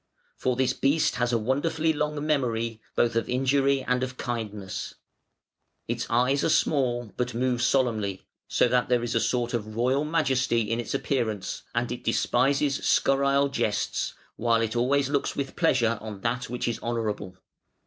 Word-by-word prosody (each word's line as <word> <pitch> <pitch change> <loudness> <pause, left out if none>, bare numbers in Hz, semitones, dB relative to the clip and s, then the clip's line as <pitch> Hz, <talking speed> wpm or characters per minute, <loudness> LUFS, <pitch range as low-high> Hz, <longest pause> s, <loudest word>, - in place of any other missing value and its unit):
For 130 -1 0
this 130 0 +1
beast 145 +3 +1
has 125 0 +1
a 120 - +3
wonderfully 155 +7 0
long 150 0 -2
memory, 115 -6 0
both 120 -1 +2
of 115 - 0
injury 135 +1 +2
and 125 0 0
of 125 0 -4
kindness. 105 -5 -4 0.9
Its - - -2
eyes 125 +4 +2
are - - +2
small 120 -8 +1
but 125 -1 -2
move 125 0 0
solemnly, 110 -7 +1 0.2
so - - +3
that 125 0 +1
there 120 -1 +2
is 120 - -2
a 115 - +3
sort 120 0 0
of 110 -2 -3
royal 130 +5 +2
majesty 135 -7 +1
in 115 +2 -1
its 120 - -3
appearance: 110 -9 -2
and 120 0 0
it 125 - -5
despises 135 +3 +2
scurrile 140 0 +2
jests, 115 -5 -1 0.2
while 115 -1 +2
it 115 +1 -2
always 135 +3 +2
looks 140 0 -1
with 135 -1 -4
pleasure 115 -3 +2
on 105 -3 -7
that 125 +3 -2
which 125 0 -3
is 120 - -2
honourable". 110 -5 -3
125 Hz, 165 wpm, -26 LUFS, 115-135 Hz, 0.9 s, a